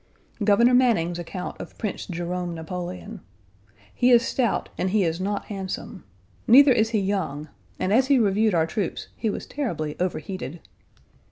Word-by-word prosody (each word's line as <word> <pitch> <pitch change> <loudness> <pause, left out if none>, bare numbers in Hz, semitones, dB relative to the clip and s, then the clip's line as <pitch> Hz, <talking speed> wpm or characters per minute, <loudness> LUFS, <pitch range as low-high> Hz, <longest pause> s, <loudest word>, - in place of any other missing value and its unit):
Governor 235 +4 +5
Manning's 205 -10 +3
account 180 +2 -6
of - - -10
Prince 210 -4 -4
Jerome 175 0 -3
Napoleon: 180 +5 -6 0.7
"He 250 - +3
is 240 -1 +5
stout 240 -5 0
and 185 - -1
he 205 +1 +2
is 165 +1 -1
not 200 +1 -2
handsome. 190 - -6 0.4
Neither 275 +3 +8
is 220 -3 +3
he 225 -2 +1
young, 160 -7 -2 0.3
and 190 - 0
as 255 +3 +4
he 280 -1 +5
reviewed 215 -2 +2
our 160 -1 +3
troops 175 +2 -4
he 225 - -1
was - - -4
terribly 160 - -3
overheated." 175 -3 -4
195 Hz, 155 wpm, -24 LUFS, 175-225 Hz, 0.7 s, Neither